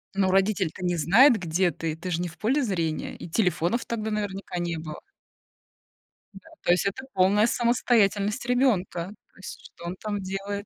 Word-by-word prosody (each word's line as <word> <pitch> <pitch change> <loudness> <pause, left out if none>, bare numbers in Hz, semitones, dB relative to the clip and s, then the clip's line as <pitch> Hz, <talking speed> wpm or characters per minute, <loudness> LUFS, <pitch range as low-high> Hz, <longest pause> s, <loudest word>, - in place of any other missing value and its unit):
Но 190 -1 +2
родитель-то 190 -2 +1
не 175 0 +1
знает, 220 - +5
где 175 +1 +1
ты. 160 -2 -4
Ты 180 +3 -6
же 170 0 -1
не 180 - -2
в 170 - -12
поле 260 +7 +1
зрения. 170 - -2
И - - -9
телефонов 180 +4 0
тогда 220 -2 -3
наверняка 200 -3 -4
не 170 -1 -2
было. 155 -1 -7 1.3
Да. 195 +11 -14
То - - +3
есть 180 +3 +2
это 200 +7 -3
полная 200 +4 +4
самостоятельность 235 -2 +1
ребёнка. 225 -9 +1 0.3
То - - -26
есть 190 - -9
что 170 - -13
он 175 +2 -4
там 205 -1 -4
делает? 195 +2 -4
195 Hz, 175 wpm, -26 LUFS, 175-215 Hz, 1.3 s, знает